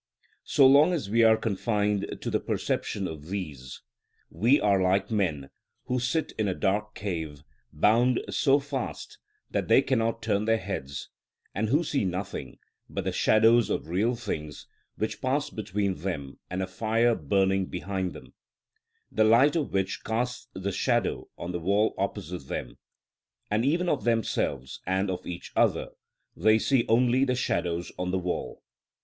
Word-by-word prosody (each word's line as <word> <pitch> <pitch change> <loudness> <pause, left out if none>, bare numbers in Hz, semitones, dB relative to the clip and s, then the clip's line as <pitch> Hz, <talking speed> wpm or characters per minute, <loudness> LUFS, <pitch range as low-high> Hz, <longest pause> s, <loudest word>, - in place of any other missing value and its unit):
So 140 - +5
long 145 +6 +6
as 135 - -3
we 115 +1 +4
are 110 -1 +6
confined 105 -1 -1
to - - -3
the - - +1
perception 95 -2 -2
of 80 -1 -8
these, 75 -10 -6 0.5
we 115 - +3
are 100 -2 +3
like 95 +4 +1
men 80 -10 -1 0.3
who 125 0 0
sit 130 +6 -1
in 110 - +1
a 95 - -1
dark 105 +2 -1
cave, 80 -7 -4 0.3
bound 115 +9 +3
so 140 -2 +4
fast 140 -3 -5 0.3
that - - -1
they - - +5
cannot 115 -3 0
turn 105 -1 +1
their 115 0 +3
heads, 65 -9 -5 0.4
and 105 +3 -1
who 150 +7 +3
see 145 -6 0
nothing 95 -6 -4 0.3
but - - -3
the - - -1
shadows 115 +2 +4
of - - -2
real 105 +8 +1
things 75 -10 -5 0.3
which 110 0 -3
pass 135 +3 0
between 105 -2 -2
them 75 -6 -5
and 90 +1 -2
a - - -3
fire 115 +4 +1
burning 95 +2 +1
behind 95 0 -3
them, - - -13 0.8
the 110 - +3
light 120 +8 +5
of 155 -4 -1
which 95 +1 -1
casts 120 +3 -2
the 95 +1 -3
shadows - - 0
on 85 - -5
the 90 - -3
wall 100 +6 +2
opposite 85 -3 -4
them; - - -5 0.7
and 105 +2 +2
even 170 +7 +1
of 145 -5 0
themselves 110 - -1
and 95 +1 +1
of 90 - -5
each 90 -1 -7
other - - +2 0.5
they 110 +4 +4
see 125 +1 +2
only 125 +3 +4
the 125 -2 +1
shadows 85 -8 -1
on 90 0 -1
the 95 - 0
wall. 90 -1 -4
105 Hz, 160 wpm, -27 LUFS, 90-120 Hz, 0.8 s, long